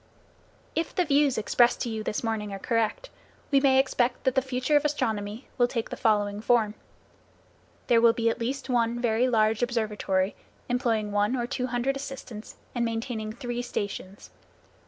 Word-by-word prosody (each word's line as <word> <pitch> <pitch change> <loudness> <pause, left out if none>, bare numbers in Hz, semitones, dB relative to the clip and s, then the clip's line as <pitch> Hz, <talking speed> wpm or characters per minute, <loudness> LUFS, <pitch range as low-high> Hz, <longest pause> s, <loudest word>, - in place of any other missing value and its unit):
If 330 - -2
the 360 -2 +2
views 285 -2 +3
expressed 240 +2 +3
to 240 - -1
you 220 -1 -3
this 215 +1 -3
morning 220 -2 -2
are 195 - -4
correct, 230 - -1 0.4
we 275 - +6
may 270 -1 +4
expect 255 -2 +1
that 260 - +2
the 265 - +3
future 260 +2 0
of 290 - +4
astronomy 225 -6 -2
will 245 - +5
take 235 -2 -3
the - - -3
following 205 -2 +1
form: 225 -2 +2 1.1
There 230 -1 +4
will 230 0 +7
be 230 0 -1
at 230 - +1
least 265 +4 -3
one 240 -2 +1
very 240 +1 +2
large 220 -1 +2
observatory 210 -5 0 0.3
employing 230 -4 0
one 205 +4 +1
or 240 -2 -1
two 250 0 -2
hundred 250 +2 0
assistants, 270 -5 -7 0.2
and 240 - 0
maintaining 225 -1 -3
three 240 +1 -4
stations. 200 -4 -5
235 Hz, 170 wpm, -27 LUFS, 215-255 Hz, 1.1 s, will